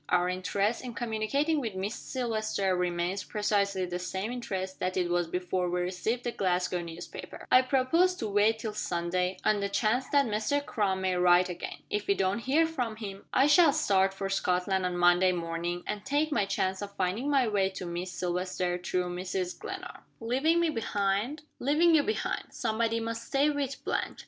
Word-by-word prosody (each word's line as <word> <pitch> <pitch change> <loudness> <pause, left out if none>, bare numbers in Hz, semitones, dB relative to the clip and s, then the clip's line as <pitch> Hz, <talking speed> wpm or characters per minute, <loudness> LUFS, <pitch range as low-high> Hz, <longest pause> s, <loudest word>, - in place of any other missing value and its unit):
Our 180 0 +3
interest 200 +5 -1
in 245 -2 -7
communicating 245 +7 0
with 225 -7 -4
Miss 195 +3 -2
Silvester 215 -8 -1
remains 180 +2 -1
precisely 200 -3 0
the 180 0 -4
same 190 +4 -3
interest 190 -6 -4
that 185 0 -1
it 175 -1 0
was 175 -1 +1
before 180 +1 -1
we 180 0 0
received 190 +7 -2
the 240 - -1
Glasgow 180 -3 0
newspaper. 170 0 -8
I 255 - +8
propose 275 +8 +2
to 225 - -3
wait 210 +2 +3
till 220 -1 -4
Sunday, 180 -1 -1
on 215 -1 +3
the 200 0 -1
chance 230 +5 +1
that 280 -1 +4
Mr. 230 +6 0
Crum 195 -7 0
may 185 -1 +1
write 180 0 +5
again. 180 - -6
If 210 0 -1
we 200 - +3
don't 190 +2 0
hear 280 +7 +3
from 250 -9 -3
him, 200 -3 -8
I 265 - +4
shall 305 +1 +6
start 195 -11 +3
for 195 0 -4
Scotland 185 0 0
on 180 -1 -3
Monday 175 +1 +5
morning, 170 +1 -3
and 210 -1 -4
take 290 +3 0
my 210 -8 +2
chance 190 -1 -1
of 200 0 -7
finding 195 +9 -1
my 270 -4 +3
way 200 -3 +2
to 190 -1 -7
Miss 175 +1 -4
Silvester, 180 0 -2
through 180 0 -2
Mrs. 185 0 -3
Glenarm." - - -7 0.2
"Leaving 270 +9 +2
me 340 -2 +2
behind?" 220 +4 -1 0.2
"Leaving 310 +6 +4
you 315 - +6
behind. 435 +9 -2
Somebody 230 0 -1
must 230 0 -4
stay 280 +2 +2
with 280 -2 -3
Blanche. - - -2
200 Hz, 185 wpm, -29 LUFS, 180-245 Hz, 0.2 s, I